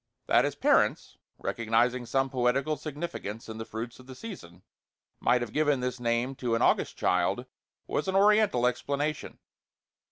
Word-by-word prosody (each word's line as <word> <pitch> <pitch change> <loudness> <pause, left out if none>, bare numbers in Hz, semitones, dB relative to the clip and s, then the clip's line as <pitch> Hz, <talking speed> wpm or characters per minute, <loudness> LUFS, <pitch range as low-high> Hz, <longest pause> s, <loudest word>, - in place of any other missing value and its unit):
That - - +4
his - - -2
parents, - - +2 0.2
recognizing 120 +2 0
some 135 +1 0
poetical 135 +4 +1
significance 145 -8 -6
in 110 0 -7
the 110 - -5
fruits 115 +2 -6
of 130 - -15
the 130 - -9
season, 95 - -10 0.6
might 125 +1 +3
have 120 -3 -5
given 150 -3 +2
this 125 0 -3
name 120 +2 0
to 120 -2 0
an 115 - -1
August - - +2
child, - - +1 0.4
was 150 - -2
an 190 - -1
Oriental 205 - +4
explanation. 140 +4 -2
125 Hz, 155 wpm, -28 LUFS, 115-145 Hz, 0.6 s, That